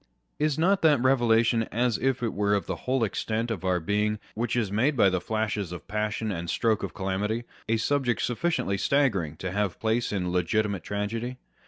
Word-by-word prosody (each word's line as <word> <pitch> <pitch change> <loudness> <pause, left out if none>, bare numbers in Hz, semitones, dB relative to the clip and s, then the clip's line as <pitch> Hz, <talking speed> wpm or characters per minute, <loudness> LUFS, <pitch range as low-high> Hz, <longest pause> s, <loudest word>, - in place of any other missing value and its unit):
Is 150 -2 +1
not 190 +5 +3
that 150 -4 +5
revelation 120 -3 +3
as 120 0 +1
it 135 -1 +1
were 105 +1 +2
of 100 - -1
the - - -3
whole 130 -1 +2
extent 110 +2 -1
of 100 -5 -4
our 90 -1 +1
being 105 +5 0 0.2
which 120 +1 -1
is 110 -5 0
made 130 +8 +1
by 100 -4 +5
the 90 -1 0
flashes 105 -4 -2
of 90 -4 -8
passion 105 0 -2
and 85 -2 -4
stroke 110 +2 +1
of - - -5
calamity, 105 +4 -1 0.3
a 115 - +3
subject 125 0 0
suf 120 - -2
ficiently 165 - 0
staggering 100 - +1
to 90 +2 -4
have 100 -1 -1
place 115 +2 0
in 90 -3 -1
legitimate 100 +2 0
tragedy 115 +5 -3
110 Hz, 190 wpm, -27 LUFS, 100-120 Hz, 0.3 s, that